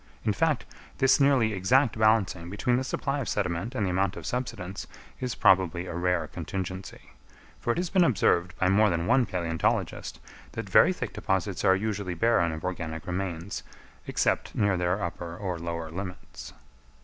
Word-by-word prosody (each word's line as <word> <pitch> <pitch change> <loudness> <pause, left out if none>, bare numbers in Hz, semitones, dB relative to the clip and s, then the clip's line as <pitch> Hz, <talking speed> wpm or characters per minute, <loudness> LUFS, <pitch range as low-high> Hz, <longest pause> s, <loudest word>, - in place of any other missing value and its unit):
In - - +2
fact, - - +1 0.3
this 135 +2 +4
nearly 135 -6 +4
exact 115 +6 +3
balancing 110 -6 +2
between 120 +5 +1
the 130 - 0
supply 135 +1 -2
of 135 - -3
sediment 100 +5 -2
and 105 - 0
the 90 - 0
amount 95 0 +1
of - - -8
subsidence 100 -7 -4 0.3
is 125 -2 -3
probably 90 -2 +3
a 90 - -6
rare 90 -1 0
contingency; 95 +2 -6 0.5
for - - -5
it - - -2
has 175 -1 -2
been 185 -2 +5
observed 90 - +2
by 95 - +2
more 105 +3 +4
than 85 -2 -1
one 125 +6 +3
palæontologist 85 -3 -1 0.4
that - - -5
very - - +6
thick - - -4
deposits - - -1
are 95 - +5
usually 100 -3 -2
barren 85 -4 +3
of 80 0 -6
organic 80 -3 -4
remains, 90 0 -3 0.5
except - - 0
near 100 -2 +2
their 90 +2 0
upper 85 0 -5
or 90 -4 -3
lower 85 -1 -4
limits. 90 +1 -7
95 Hz, 170 wpm, -27 LUFS, 85-110 Hz, 0.5 s, very